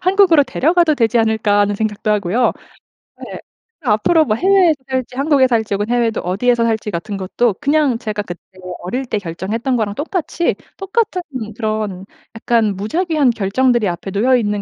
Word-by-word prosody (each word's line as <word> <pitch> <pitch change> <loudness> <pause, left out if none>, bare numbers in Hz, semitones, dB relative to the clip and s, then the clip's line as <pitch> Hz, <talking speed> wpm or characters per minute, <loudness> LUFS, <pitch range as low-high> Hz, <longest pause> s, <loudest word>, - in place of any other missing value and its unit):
'한국으로 370 -4 +5
데려가도 310 +4 +2
되지 230 -1 +2
않을까?' 220 -2 +2
하는 205 0 +1
생각도 215 0 -2
하고요. 210 +3 +1 0.7
네. - - -9
으 - - -7 0.5
앞으로 255 +9 +3
뭐 215 -5 0
해외에서 370 - +4
살지 260 -1 -3
한국에서 275 -1 +3
살지 220 -2 -1
혹은 205 +2 -2
해외에도 235 -2 0
어디에서 230 +7 +1
살지 220 -2 -1
같은 200 +3 -4
것도 195 +3 0
그냥 285 -3 +2
제가 215 -3 -4
그때 175 -4 -8 0.4
어릴 250 +10 -3
때 230 - -2
결정했던 205 +8 -3
거랑 205 -3 -2
똑같이 335 - -2 0.2
똑같은 390 -1 -1 0.3
그런 215 -4 -3 0.3
약간 225 -2 +1
무작위한 305 - 0
결정들이 230 +1 +1
앞에 180 +2 -4
놓여 240 +6 +2
있는 210 -4 0
230 Hz, 385 characters per minute, -17 LUFS, 205-280 Hz, 0.7 s, 한국으로